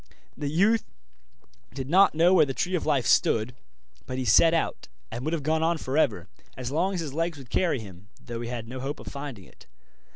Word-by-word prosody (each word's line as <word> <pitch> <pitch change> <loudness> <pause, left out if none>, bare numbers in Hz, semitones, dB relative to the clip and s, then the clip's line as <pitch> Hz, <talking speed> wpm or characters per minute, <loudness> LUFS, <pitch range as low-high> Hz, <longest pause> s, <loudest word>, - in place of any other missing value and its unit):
The 145 -2 -3
youth 200 +8 +3 0.9
did 130 -2 -4
not 185 +3 +5
know 170 +3 +5
where 160 -5 +5
the 135 - -4
Tree 180 +2 -1
of 170 -4 -1
Life 140 -6 +2
stood, 115 +3 +2 0.5
but 130 - -4
he 130 - -2
set 160 +9 +6
out, 165 -1 -1 0.2
and 120 - -5
would 155 +3 -2
have 160 -4 -2
gone 160 +2 +1
on 165 +1 +1
for 135 -3 -4
ever, 105 - +1 0.3
as 130 0 -4
long 180 +6 0
as 175 - -2
his 150 -4 -5
legs 165 0 -1
would 130 -4 -13
carry 170 -8 +1
him, 100 -2 -12
though 115 -1 -7
he 120 - -5
had 120 -2 -5
no 130 +2 -7
hope 135 +3 -4
of - - -11
finding 140 -8 -7
it. - - -19
145 Hz, 225 wpm, -26 LUFS, 125-165 Hz, 0.9 s, set